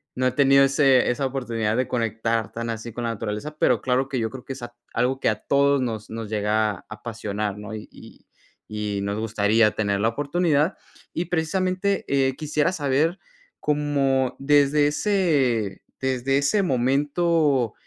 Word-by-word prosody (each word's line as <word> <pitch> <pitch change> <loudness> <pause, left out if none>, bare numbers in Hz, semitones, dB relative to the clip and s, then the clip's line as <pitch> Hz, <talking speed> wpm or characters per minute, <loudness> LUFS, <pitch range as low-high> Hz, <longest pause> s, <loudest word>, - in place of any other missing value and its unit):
no 130 0 +1
he - - +1
tenido 135 +1 +5
ese 135 -2 +4
esa 130 +3 0
oportunidad 115 -5 -2
de 130 +1 0
conectar 115 -2 -1
tan 115 0 -5
así 115 0 -5
con 120 - -5
la 115 - -1
naturaleza, 115 +8 -5
pero - - +2
claro 130 +1 +1
que 135 -2 -2
yo 110 -1 -1
creo 125 +2 -10
que 135 - -5
es 135 - -11
a 120 0 -8 0.2
algo 125 +3 0
que - - +2
a 110 -1 -2
todos 140 0 +3
nos 110 -4 -4
nos 110 -1 -6
llega 105 0 +1
a 100 - -10
apasionar, 105 -2 -4
¿no? 105 +1 -8
Y 105 - -8
y - - -15 0.4
y 105 -1 -3
nos 100 +1 -2
gustaría 110 0 +2
tener 100 -2 0
la 110 - +2
oportunidad. 150 +4 0 0.4
Y 170 - -2
precisamente, 185 +3 0
eh, 135 -1 +1
quisiera 150 +2 0
saber, 155 +2 0 0.4
como 140 -3 +1
desde 145 +1 +4
ese 145 - +1 0.2
desde 130 +1 0
ese 145 +9 +2
momento 140 - +1
130 Hz, 170 wpm, -24 LUFS, 110-145 Hz, 0.4 s, tenido